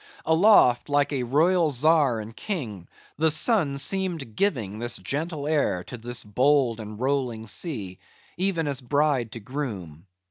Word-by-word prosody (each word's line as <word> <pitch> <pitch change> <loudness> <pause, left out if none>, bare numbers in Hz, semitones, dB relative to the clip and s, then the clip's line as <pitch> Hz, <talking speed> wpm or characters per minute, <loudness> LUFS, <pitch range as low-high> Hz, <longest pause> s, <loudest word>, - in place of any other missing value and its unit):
Aloft, 160 - +4
like 145 0 +1
a 135 - -1
royal 160 +7 +2
czar 145 -3 +2
and 110 +1 -9
king, 115 - -5 0.3
the 160 +1 +3
sun 155 - +3
seemed 165 - -1
giving 115 - -1
this 120 0 -1
gentle 150 0 -4
air 145 - 0
to - - -9
this 120 +1 -2
bold 125 +2 +1
and 105 -1 -8
rolling 130 -4 -2
sea; 105 - -5 0.4
even 175 -3 -1
as 140 -2 -3
bride 135 -2 0
to 115 - -6
groom. 100 - -7
135 Hz, 145 wpm, -25 LUFS, 115-155 Hz, 0.4 s, Aloft